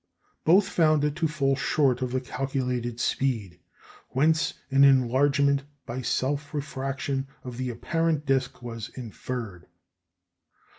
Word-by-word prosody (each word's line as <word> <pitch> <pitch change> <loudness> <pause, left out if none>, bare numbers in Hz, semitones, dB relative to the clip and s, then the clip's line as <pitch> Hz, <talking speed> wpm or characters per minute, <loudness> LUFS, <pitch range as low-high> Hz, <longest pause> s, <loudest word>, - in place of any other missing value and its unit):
Both 190 +5 +5
found 155 -5 +3
it 150 0 0
to 165 -1 +1
fall 140 -3 +1
short 135 -2 +1
of 125 -1 -1
the 130 0 0
calculated 125 -3 -2
speed, 110 -11 -1 0.5
whence 155 +4 +2 0.2
an 135 +1 +6
enlargement, 140 +2 +4 0.2
by 120 +2 -4
self 140 +5 -1
refraction, 135 -1 -3 0.2
of 125 -2 -7
the 130 0 -2
apparent 160 +5 -1
disc 130 -2 0
was 115 -3 -6
inferred. 115 -6 -6
135 Hz, 120 wpm, -27 LUFS, 125-145 Hz, 0.5 s, an